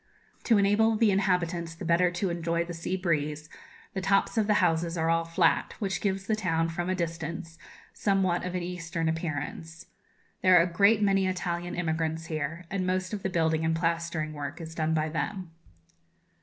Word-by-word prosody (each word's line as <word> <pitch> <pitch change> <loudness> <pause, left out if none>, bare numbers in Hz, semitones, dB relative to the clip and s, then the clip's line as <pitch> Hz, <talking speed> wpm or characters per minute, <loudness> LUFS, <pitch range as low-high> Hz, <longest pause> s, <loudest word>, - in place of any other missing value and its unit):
To 230 - +5
enable 205 +3 +3
the 215 -1 +4
inhabitants 180 -3 0
the - - -7
better 170 +2 +3
to 180 +1 -2
enjoy 170 0 -1
the 175 - -6
sea 165 +3 -3
breeze, 155 -4 -1 0.4
the 190 - -3
tops 195 +4 +2
of 220 -2 +2
the 210 - +3
houses 170 -2 +1
are 165 0 +1
all 165 0 +1
flat, 165 +1 +1
which 195 -3 -2
gives 195 -1 -1
the 215 - +1
town, 165 -5 0
from 175 +2 -3
a 185 - +1
distance, 165 -1 -4 0.3
somewhat 195 -3 +1
of 180 0 -4
an 180 - -2
eastern 170 -2 -3
appearance. 160 0 -4 0.6
There 185 -1 +6
are 170 - +7
a - - 0
great 200 +5 +3
many 195 -1 +3
Italian 175 -1 -3
immigrants 160 -1 -1
here, 160 +2 -4
and 190 -2 -1
most 185 +2 -1
of 205 - -3
the 190 - -1
building 160 -2 +1
and 160 0 +1
plastering 165 -2 -1
work 145 +3 -6
is 160 -1 -7
done 160 -1 0
by 155 0 +1
them. 180 +2 -3
170 Hz, 185 wpm, -28 LUFS, 165-190 Hz, 0.6 s, are